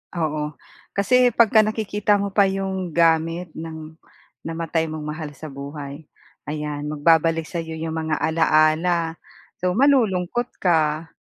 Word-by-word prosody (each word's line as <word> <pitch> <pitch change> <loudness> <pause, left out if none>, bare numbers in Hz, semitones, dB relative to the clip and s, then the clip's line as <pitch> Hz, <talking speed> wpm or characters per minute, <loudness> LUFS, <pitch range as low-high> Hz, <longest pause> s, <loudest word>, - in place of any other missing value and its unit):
Oo. 155 -2 -2 0.4
Kasi 250 +5 +3
pagka 220 -1 +5
nakikita 210 -1 0
mo 200 -1 -3
pa 205 - +6
yung 190 -2 -2
gamit 165 +1 +2
ng 160 -1 -8 0.5
namatay 165 0 -2
mong 155 -1 -5
mahal 155 0 -5
sa 150 +2 -10
buhay. 140 +1 -8 0.4
Ayan, 150 -1 -4
magbabalik 165 +1 +2
sayo 165 -2 -5
yung 160 0 -4
mga 160 -1 -1
alaala 160 +1 +2 0.5
so, 180 0 +1
malulungkot 240 -4 +2
ka. 160 -2 +1
165 Hz, 125 wpm, -22 LUFS, 155-190 Hz, 0.5 s, pa